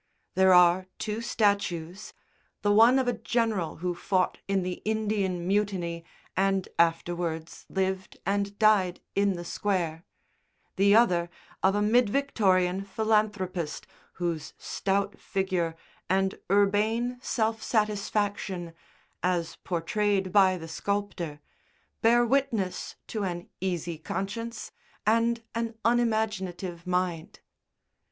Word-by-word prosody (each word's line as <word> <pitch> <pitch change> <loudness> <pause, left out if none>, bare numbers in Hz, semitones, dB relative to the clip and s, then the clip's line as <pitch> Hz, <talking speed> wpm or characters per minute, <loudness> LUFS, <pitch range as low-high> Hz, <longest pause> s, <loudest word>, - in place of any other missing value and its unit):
There 190 0 +5
are 180 +1 +6
two 215 +1 -3
statues, 200 -5 0 0.5
the 205 - +3
one 230 +5 +7
of 260 -2 +1
a 245 - +2
general 220 -9 -1
who 180 - +1
fought 185 +1 0
in 195 -1 +1
the 180 0 -4
Indian 205 -5 -1
Mutiny 190 -4 0 0.3
and 195 0 +1
afterwards 170 -1 0
lived 190 0 -2
and 200 +1 -1
died 205 -5 +3
in 200 0 +2
the 175 -1 -6
Square, 170 -4 -1 0.7
the 200 +2 +5
other 175 -7 +4 0.3
of 190 +1 +3
a 205 - +2
mid 230 +1 +4
Victorian 195 -8 +2
philanthropist 195 -6 -1 0.3
whose 170 -4 -3
stout 200 +1 -1
figure 185 -4 -1 0.3
and 190 0 +1
urbane 215 +5 +2
self 225 -3 -1
satisfaction 205 -4 -1 0.5
(as 175 -2 -1
portrayed 190 +2 0
by 190 -2 +5
the 165 -1 -8
sculptor) 175 -4 -3 0.6
bear 240 +1 +5
witness 235 -7 0
to 215 - -4
an 175 -3 -4
easy 175 -3 -2
conscience 210 +8 -4 0.3
and 230 +1 +2
an 230 0 -2
unimaginative 215 -7 0
mind. 180 -3 -2
195 Hz, 110 wpm, -28 LUFS, 180-215 Hz, 0.7 s, one